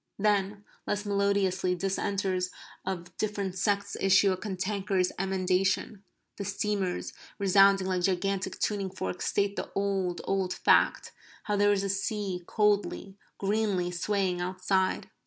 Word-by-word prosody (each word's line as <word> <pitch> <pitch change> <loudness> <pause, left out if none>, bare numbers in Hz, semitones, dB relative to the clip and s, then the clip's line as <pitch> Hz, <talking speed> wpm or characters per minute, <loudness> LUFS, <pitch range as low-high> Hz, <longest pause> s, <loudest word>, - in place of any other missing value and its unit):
Then, 205 0 0 0.2
less 205 0 -1
melodiously, 200 -2 +1
dissenters 190 0 -1 0.4
of 175 -2 -4
different 200 -3 -2
sects 200 +1 0
issue 195 0 +5
a - - +1
cantankerous 190 -1 -1
emendation. 190 +2 0 0.3
The 200 - -3
steamers, 200 -2 -2 0.2
resounding 195 -1 +5
like 185 -1 0
gigantic 190 +1 0
tuning 200 -2 -1
forks, 95 - -4
state 200 0 0
the - - -3
old 195 -3 -1
old 190 -1 -1
fact - - +3 0.3
how 210 - -1
there 205 0 +4
is 200 -1 +1
a - - -1
sea 195 -2 -2
coldly, 205 -2 +1 0.2
greenly, 200 -3 0
swaying 185 0 0
outside. 185 +1 0
195 Hz, 125 wpm, -29 LUFS, 185-200 Hz, 0.4 s, issue